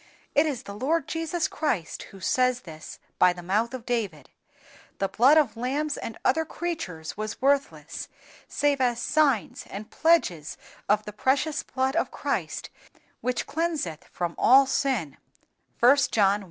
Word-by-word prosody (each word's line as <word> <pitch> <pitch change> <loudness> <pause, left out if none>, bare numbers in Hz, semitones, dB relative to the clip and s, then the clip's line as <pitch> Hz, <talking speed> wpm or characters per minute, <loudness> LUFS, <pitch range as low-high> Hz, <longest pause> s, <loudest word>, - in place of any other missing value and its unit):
_" - - -27 0.3
It 295 +2 +4
is 280 -6 -3
the 200 - -8
Lord 295 +10 0
Jesus 330 +1 -1
Christ 225 - -2
who 195 - -13
says 255 +5 +1
this 160 -3 -10 0.2
by 180 - +6
the 175 0 -10
mouth 210 +6 +1
of 255 -3 -7
David. 210 - -3 0.7
The 195 - 0
blood 260 +10 +5
of 280 -8 +3
lambs 280 +6 -1
and 225 - -6
other 320 - +3
creatures 305 - -5
was 215 0 -4
worthless, 280 +1 0 0.4
save 285 -2 +1
as 240 -2 +2
signs 280 -6 +1
and 210 +2 -8
pledges 180 - +2 0.3
of 210 +1 +3
the 210 - -7
precious 270 +7 +1
blood 260 +2 -1
of 335 - +1
Christ - - -3 0.5
which 250 0 -1
cleanseth 305 - -2
from 175 -1 -4
all 270 +2 +7
sin, 260 - -1 0.7
(John 280 +3 +6
i. 200 -1 +4
255 Hz, 155 wpm, -26 LUFS, 200-290 Hz, 0.7 s, all